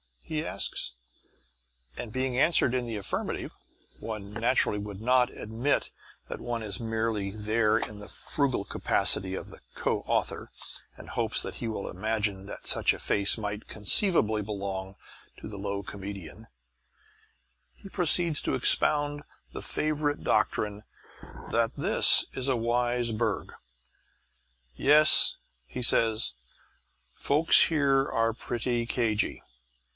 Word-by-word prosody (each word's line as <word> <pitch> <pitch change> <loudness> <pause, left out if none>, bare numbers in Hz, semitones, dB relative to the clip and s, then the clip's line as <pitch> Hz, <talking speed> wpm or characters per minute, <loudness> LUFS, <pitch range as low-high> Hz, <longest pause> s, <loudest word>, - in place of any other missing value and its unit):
he 155 - -4
asks; 95 -9 0 1.0
and 110 -3 -6
being 130 -1 -1
answered 145 -4 +4
in 125 -1 -1
the 115 -2 -4
affirmative 100 -2 -4 0.5
(one 105 -2 -7
naturally 115 -2 0
would 100 -1 -8
not 125 +1 +2
admit 115 +6 -2 0.4
that - - -6
one 120 -2 -4
is 100 -3 -3
merely 110 -3 -2
there 110 +1 0
in 105 -1 -4
the 105 - -10
frugal 135 -5 -2
capacity 95 -1 -1
of - - -8 0.2
co - - -1
author, - - -2 0.5
and - - -13
hopes - - -1
that - - -7
he 115 - -5
will 110 -3 -5
imagine 105 0 -3
that 100 - -10
such - - +3
a - - -8
face 100 +2 +3
might 105 -1 -6
conceivably 110 - +2
belong 100 -2 -5 0.4
to - - -9
the 105 - -8
low 100 0 -4
comedian) 100 +1 -9 1.3
he 195 - -13
proceeds 170 -3 +2
to - - -2
expound 145 -1 +2 0.3
the - - -7
favourite 150 -1 -2
doctrine 105 0 -1 0.7
that 115 -1 0
this - - +6
is 130 0 -2
a 135 - +1
wise 120 0 0
burg. 110 -2 -3 1.2
"Yes," 150 - +7 0.3
he 125 - -6
says, 115 - +2 0.8
"folks 150 +3 +4
here 140 -4 +1
are 115 0 0
pretty 120 0 -3
cagy. 110 -4 -1
115 Hz, 125 wpm, -27 LUFS, 105-130 Hz, 1.3 s, Yes